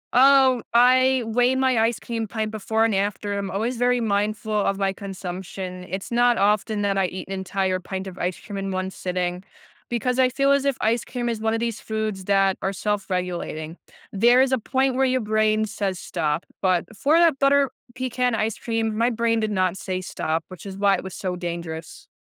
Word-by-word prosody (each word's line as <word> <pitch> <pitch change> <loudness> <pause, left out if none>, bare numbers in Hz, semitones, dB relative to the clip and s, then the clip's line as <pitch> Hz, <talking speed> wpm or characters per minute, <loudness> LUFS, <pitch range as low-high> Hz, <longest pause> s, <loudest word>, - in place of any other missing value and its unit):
Oh, 265 -1 +6
I 255 +1 +5
weigh 245 +3 +2
my 260 -2 +2
ice 225 0 +2
cream 225 -2 -4
pint 215 -1 -2
before 220 +1 0
and 225 - +1
after, 205 +1 -1
I'm 200 -1 -3
always 230 +5 -2
very 245 +1 +2
mindful 215 0 -1
of 200 -2 +1
my 195 -1 0
consumption; 185 -1 -6
it's 190 +5 -5
not 240 0 +3
often 210 +1 +1
that 195 -1 +1
I 190 - +2
eat 185 0 -7
an - - -3
entire 190 0 -1
pint 190 +1 -5
of 190 -1 -9
ice 180 0 -2
cream 205 - -8
in 195 0 -3
one 185 0 -2
sitting 180 -1 -3 0.5
because 250 +2 -1
I 255 -1 +5
feel 275 +2 +2
as 280 0 +2
if 275 -2 +1
ice 225 +1 +1
cream 240 -1 -3
is 230 -2 -2
one 220 0 +1
of - - -1
these 230 -2 -2
foods 215 -3 -3
that 195 -1 +3
are 195 - -1
self-regulating. 180 -5 -3 0.4
There 240 +5 +5
is 270 - 0
a 260 - +2
point 265 +3 +1
where 265 +1 +3
your 255 0 +2
brain 215 0 +2
says, 200 -3 -3
"Stop," 160 -2 -2 0.2
but 185 -2 +2
for 295 +9 +3
that 335 -5 +4
butter 275 -1 +3 0.2
pecan 250 -1 0
ice 220 0 -1
cream, 225 -2 -1
my 230 +2 +2
brain 230 -1 +1
did 215 -1 -1
not 185 -2 +1
say, 185 -2 -3
"Stop," 165 -3 -2
which 185 +2 -10
is 195 -1 -7
why 200 0 +3
it - - -5
was 190 -1 -7
so 185 -2 -3
dangerous. 170 -2 -6
215 Hz, 205 wpm, -23 LUFS, 190-240 Hz, 0.5 s, Oh